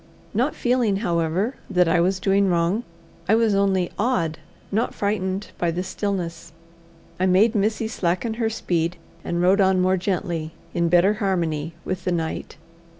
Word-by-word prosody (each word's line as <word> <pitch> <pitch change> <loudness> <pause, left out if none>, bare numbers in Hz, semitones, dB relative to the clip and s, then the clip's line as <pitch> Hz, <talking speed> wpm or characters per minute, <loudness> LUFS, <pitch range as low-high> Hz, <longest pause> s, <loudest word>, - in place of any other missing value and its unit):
Not - - +1
feeling, 240 -4 +1
however, 170 +8 0
that 180 -3 +3
I 170 +1 +3
was 190 +2 +1
doing 195 +1 +2
wrong, 175 +5 +1 0.5
I 220 - +6
was 225 -2 +3
only 195 -3 +2
awed 185 -9 0 0.3
not 220 +4 0
frightened 200 -1 -2
by 175 - +1
the 175 +2 -2
stillness. 175 -4 -4 0.7
I 185 - +2
made 200 +5 +4
Missy 220 +1 0
slacken 195 +2 -1
her 225 - +2
speed, 175 -5 -1 0.3
and 175 0 -1
rode 190 +3 +4
on 190 -1 +3
more 185 +1 +3
gently, 175 -4 -2 0.2
in 170 -1 +1
better 180 +4 +5
harmony 165 -5 -1
with 185 -1 -3
the 180 - 0
night. 165 -2 -3
185 Hz, 155 wpm, -23 LUFS, 170-200 Hz, 0.7 s, I